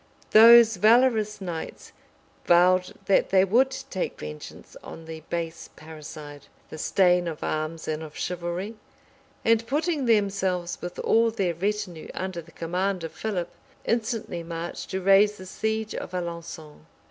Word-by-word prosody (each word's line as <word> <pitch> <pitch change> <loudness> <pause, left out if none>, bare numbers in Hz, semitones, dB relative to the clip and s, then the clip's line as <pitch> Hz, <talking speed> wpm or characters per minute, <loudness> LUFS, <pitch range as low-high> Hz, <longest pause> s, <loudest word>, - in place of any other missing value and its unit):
Those 230 0 +8
valorous 220 0 +3
knights 170 -4 -6 0.6
vowed 180 +1 +4
that 195 - +3
they 190 0 +4
would 245 +7 +3 0.2
take 190 - -3
vengeance 75 0 -9
on 165 - -10
the 160 0 -8
base 165 -1 -4
parricide, 150 -2 -11 0.2
the 155 - -8
stain 180 0 +2
of 160 -2 -5
arms 155 +1 -3
and 155 0 -2
of 155 -1 -9
chivalry; 180 +5 -4 0.7
and 230 0 +3
putting 300 +1 0
themselves, 195 -5 0
with 175 0 -6
all 230 +1 +3
their 195 -6 -1
retinue, 190 -2 -3
under 185 -2 -4
the 165 0 -18
command 180 +3 -2
of 165 - -5
Philip, 185 -3 -3 0.4
instantly 225 -6 -2
marched 165 0 -6
to 190 - -3
raise 200 +2 +4
the 185 - -10
siege 220 +3 -3
of - - -6
Alençon. 170 -3 -6
185 Hz, 140 wpm, -25 LUFS, 165-215 Hz, 0.7 s, Those